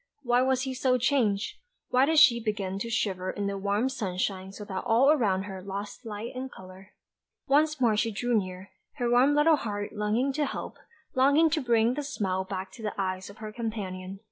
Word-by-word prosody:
Why 245 0 +3
was 260 0 +1
he 265 -1 -3
so 255 0 +2
changed? 230 -6 +1 0.3
Why 255 +2 +4
did 320 0 +2
she 245 -7 +6
begin 195 -3 -2
to 230 - -4
shiver 190 -5 -1
in 205 - -3
the 200 0 -2
warm 200 +5 0
sunshine 190 -5 -3
so 210 +1 -9
that 190 -2 -4
all 245 +4 +4
around 205 -10 +2
her 190 -2 -7
lost 200 +5 -6
light 215 +2 -5
and 260 +1 -5
colour? 190 +1 -13 0.5
Once 305 +1 +2
more 235 -4 +3
she 225 +2 +1
drew 240 +3 -1
near, 185 -2 -3 0.2
her 245 -4 -1
warm 260 +4 +5
little 300 +1 +5
heart 205 -5 -4
longing 220 +6 0
to 295 +1 0
help, - - -6 0.4
longing 285 +5 +4
to 315 0 +1
bring 235 -1 +3
the 295 - -3
smile 195 -10 -2
back 190 0 -5
to 225 - -12
the 210 -1 -3
eyes 185 0 -2
of 200 - -13
her 215 -1 -7
companion. 195 -5 -5
220 Hz, 200 wpm, -28 LUFS, 195-260 Hz, 0.5 s, she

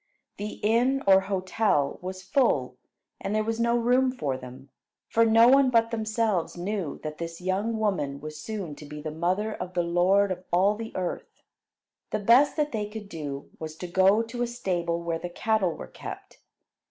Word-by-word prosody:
The 210 +1 -4
inn 245 +5 +2
or 190 -1 +7
hotel 190 -5 0
was 185 +1 -6
full, 165 - +1 0.4
and 200 +2 -3
there 215 - +2
was 225 +1 -2
no 235 +1 +2
room 250 +2 +3
for 145 - -2
them; 130 +1 -10 0.4
for 230 - +3
no 225 +1 +6
one 270 +1 +6
but 230 -1 +3
themselves 220 -6 -1
knew 185 -3 -3
that 155 0 -6
this 165 0 -5
young 195 +5 -1
woman 165 -11 -1
was 155 +1 -8
soon 200 -5 -5
to 150 - -10
be 150 +1 -8
the 155 +1 -5
mother 185 +7 -1
of 180 -2 -7
the 175 - +2
Lord 185 +4 +3
of 185 0 -4
all 190 +4 +4
the 225 +1 -6
earth. 180 -2 -3 0.8
The - - -1
best 240 +10 +4
that 300 -1 +1
they 210 -2 -3
could 210 -1 -8
do 145 -5 -6
was 155 -1 -6
to 180 - -7
go 190 +5 +4
to 235 +2 -6
a 245 - +1
stable 175 -8 -2
where 165 -1 -2
the 175 - -5
cattle 200 -1 0
were - - -7
kept. - - -10
195 Hz, 190 wpm, -27 LUFS, 170-225 Hz, 0.8 s, or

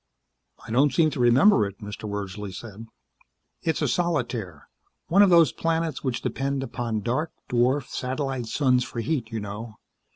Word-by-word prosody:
"I - - -8
don't 135 +5 +4
seem 160 -2 +3
to 145 - -5
remember 125 - +5
it," 100 0 -10
Mr. 105 +1 -7
Wordsley 100 0 -5
said. 110 +3 -9 0.7
"It's 160 -1 -1
a - - +2
solitaire. 120 - -2 0.4
One 195 +4 +5
of 200 - +7
those 170 -3 +6
planets 165 -3 -1
which 130 -4 -2
depend 135 0 -2
upon 120 -5 -3
dark, 130 +9 -1 0.2
dwarf, 125 +3 +2
satellite 130 -2 -3
suns 125 0 +2
for 120 - -6
heat, 120 -1 -2
you 115 - -3
know. 105 +2 -7
125 Hz, 160 wpm, -25 LUFS, 110-150 Hz, 0.7 s, of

